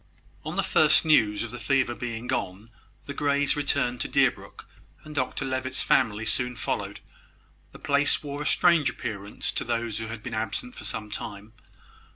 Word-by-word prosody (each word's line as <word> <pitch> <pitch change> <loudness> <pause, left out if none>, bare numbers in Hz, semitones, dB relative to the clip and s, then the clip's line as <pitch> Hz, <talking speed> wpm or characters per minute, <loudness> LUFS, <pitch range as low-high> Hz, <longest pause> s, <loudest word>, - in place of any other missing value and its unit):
On - - -5
the - - +2
first 155 +1 +4
news 110 -10 +4
of 120 - -5
the 120 - -6
fever 125 +2 +1
being 120 -1 -5
gone, 100 +1 -3 0.3
the 140 - -5
Greys 145 0 +2
returned 140 -4 0
to - - -1
Deerbrook, - - 0 0.4
and 155 - -10
Dr 135 0 -1
Levitt's 130 0 -1
family 110 -3 +2
soon 125 +3 0
followed. 110 - -3 0.7
The - - -12
place 140 +2 +2
wore 145 0 -5
a 150 - -2
strange 170 -4 +4
appearance 105 -4 -4
to - - -2
those 115 -2 -2
who 110 - -4
had 110 -1 -7
been 120 - -6
absent 110 - -3
for - - -8
some 105 -1 -4
time. 105 0 -6
120 Hz, 175 wpm, -27 LUFS, 110-140 Hz, 0.7 s, first